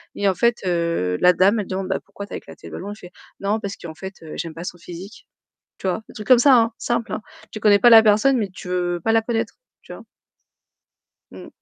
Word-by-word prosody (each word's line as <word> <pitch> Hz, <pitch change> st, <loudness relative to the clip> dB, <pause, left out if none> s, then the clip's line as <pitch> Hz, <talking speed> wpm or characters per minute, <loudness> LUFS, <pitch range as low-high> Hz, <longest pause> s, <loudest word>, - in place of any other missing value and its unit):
et 200 Hz, -, 0 dB
en 195 Hz, -, +3 dB
fait, 235 Hz, +2 st, +2 dB
heu, 170 Hz, -, 0 dB
la 180 Hz, -, +7 dB
dame 200 Hz, +5 st, +3 dB
elle 200 Hz, -, -7 dB
demande: 190 Hz, 0 st, -3 dB
«Bah, 190 Hz, -, 0 dB
pourquoi 200 Hz, -, -9 dB
tu -, -, -11 dB
as -, -, -3 dB
éclaté -, -, -13 dB
le -, -, -11 dB
ballon?» 200 Hz, +2 st, -6 dB
Il 210 Hz, -, -9 dB
fait: 180 Hz, -4 st, -13 dB, 0.3 s
«Non 205 Hz, +2 st, 0 dB
parce 200 Hz, -2 st, -5 dB
qu'en 160 Hz, -2 st, -9 dB
fait, 190 Hz, +4 st, -8 dB
heu, 155 Hz, -, -9 dB
j'aime 165 Hz, -2 st, -5 dB
pas 165 Hz, -, -8 dB
son 180 Hz, -, -6 dB
physique». 180 Hz, +6 st, -11 dB, 0.5 s
Tu -, -, -10 dB
vois? 185 Hz, +4 st, -1 dB
Des -, -, -14 dB
trucs 210 Hz, -, -7 dB
comme 255 Hz, -2 st, +7 dB
ça, 260 Hz, 0 st, +6 dB
hein, 230 Hz, 0 st, +1 dB
simple, 235 Hz, -1 st, -2 dB
hein. 215 Hz, -, -3 dB, 0.3 s
Tu 215 Hz, -, -7 dB
connais 205 Hz, -1 st, +5 dB
pas 240 Hz, -, +6 dB
la 225 Hz, -1 st, +10 dB
personne, 220 Hz, +5 st, +4 dB
mais 205 Hz, -3 st, -2 dB
tu 185 Hz, 0 st, -11 dB
veux 175 Hz, -1 st, -1 dB
pas 225 Hz, -, +2 dB
la 225 Hz, 0 st, +4 dB
connaître, 225 Hz, -1 st, -2 dB, 0.3 s
tu -, -, -10 dB
vois? -, -, -10 dB, 1.3 s
Mmh. -, -, -11 dB
200 Hz, 255 wpm, -21 LUFS, 180-225 Hz, 1.3 s, la